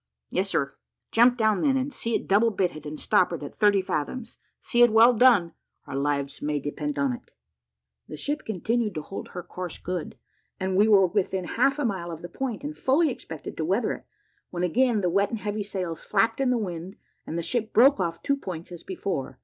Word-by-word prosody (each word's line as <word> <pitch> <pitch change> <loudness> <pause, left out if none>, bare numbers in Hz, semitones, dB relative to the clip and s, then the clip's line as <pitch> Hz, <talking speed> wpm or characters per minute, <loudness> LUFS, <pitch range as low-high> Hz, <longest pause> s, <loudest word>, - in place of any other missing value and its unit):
"Yes, 195 +1 0
sir." 140 -6 0 0.4
"Jump 245 +2 +5
down, 220 -4 +2
then, 270 -2 +3
and 265 +2 -2
see 230 0 -2
it - - -2
double 210 +4 +4
bitted 175 -8 -2
and 150 +1 -6
stoppered 175 -4 +2
at 145 - -7
thirty 205 -2 +3
fathoms. 190 - -4 0.2
See 240 - +1
it 240 - +8
well 230 +3 +7
done 220 -8 +5 0.3
our - - -6
lives 140 0 -1
may 150 0 -1
depend 145 +1 -4
upon 140 -3 +1
it." - - -10 0.8
The - - -8
ship 295 - -2
continued 220 +1 -1
to 155 - -3
hold 195 - -7
her 180 - -7
course 180 -1 -6
good; 180 -2 -5 0.4
and 190 0 -1
we 205 +3 +5
were 200 -3 +6
within 190 0 -1
half 270 +8 +1
a 290 - -1
mile 190 -6 -2
of 165 -1 -7
the 175 - -6
point, 250 - -4
and 295 +1 -5
fully 295 +3 +2
expected 160 - -8
to 160 - -1
weather 195 +8 +1
it, - - -10 0.4
when 175 0 -3
again 230 +4 +2
the 180 - +1
wet 200 +2 +2
and 230 - -3
heavy 210 0 -3
sails 185 -5 -4
flapped 225 +5 +1
in 265 - +2
the 250 - +2
wind, 185 -2 -5 0.3
and 165 - -3
the 170 - -2
ship 220 +6 -1
broke 260 +2 +6
off 170 -2 -2
two 280 -1 +1
points 180 -9 -7
as 175 -2 -8
before. 180 -9 -4
195 Hz, 215 wpm, -26 LUFS, 170-230 Hz, 0.8 s, it